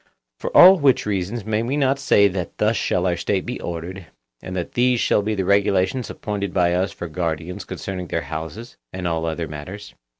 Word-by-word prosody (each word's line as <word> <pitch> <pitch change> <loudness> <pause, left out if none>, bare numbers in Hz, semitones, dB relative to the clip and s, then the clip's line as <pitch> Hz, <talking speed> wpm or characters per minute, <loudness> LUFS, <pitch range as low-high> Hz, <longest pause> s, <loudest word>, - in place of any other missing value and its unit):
For - - -3
all 190 0 +9
which 140 -3 +3
reasons 100 +2 -2
may 110 0 0
we 130 +5 -1
not 135 -1 +2
say 100 -6 +4
that 90 -2 -5
thus 110 +2 +2
shall 90 -4 0
our 90 -1 +1
State 95 +1 -1
be 125 +1 -5
ordered, 85 +1 -6 0.3
and 95 - -7
that 90 -2 -3
these 125 0 +2
shall 105 - +2
be 110 +1 -2
the 95 -2 -1
regulations 100 +4 +1
appointed 100 -3 -4
by 90 -2 +3
us 90 +2 0
for 85 - -7
guardians 80 +1 -4
concerning 90 -2 -5
their 85 - -2
houses 80 - -7
and 90 -2 -4
all 80 -1 -1
other 80 0 -3
matters? 95 +8 -8
95 Hz, 200 wpm, -22 LUFS, 85-110 Hz, 0.3 s, all